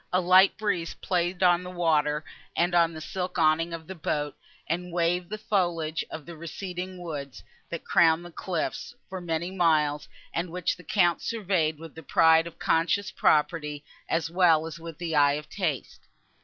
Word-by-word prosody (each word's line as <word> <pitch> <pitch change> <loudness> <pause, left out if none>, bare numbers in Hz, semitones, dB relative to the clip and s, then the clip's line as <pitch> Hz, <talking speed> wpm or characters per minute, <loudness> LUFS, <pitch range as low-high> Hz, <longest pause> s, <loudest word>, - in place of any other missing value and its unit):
A 185 - +3
light 185 +2 +5
breeze 200 -6 -1
played 180 0 -1
on 175 -1 +5
the 180 - -7
water, 155 -4 +1 0.3
and 175 +1 +1
on 170 -1 +4
the 160 -1 -8
silk 185 +2 -4
awning 165 +1 +3
of 165 -1 -6
the 190 - -7
boat, 150 -4 -2 0.3
and 175 +2 -3
waved 175 +1 0
the 215 - -4
foliage 175 -7 -1
of 160 - -8
the 170 - -9
receding 180 +3 -6
woods, 145 -6 -7 0.3
that 170 - -5
crowned 170 -2 +4
the 175 - -10
cliffs, 170 -1 -4
for 190 -1 -5
many 170 +1 -2
miles, 155 -5 +2 0.3
and 170 +1 -2
which 180 +1 -1
the 180 - -15
Count 175 0 +2
surveyed 185 -8 0
with 160 0 -11
the 160 - -10
pride 160 +2 +4
of 170 - -11
conscious 190 +5 +1
property, 150 -3 +1 0.2
as 165 -1 0
well 170 -3 +4
as 165 0 -7
with 165 -2 -9
the 165 -2 -3
eye 145 -1 +5
of 150 +1 -5
taste. 165 -9 -3
170 Hz, 180 wpm, -27 LUFS, 160-180 Hz, 0.3 s, light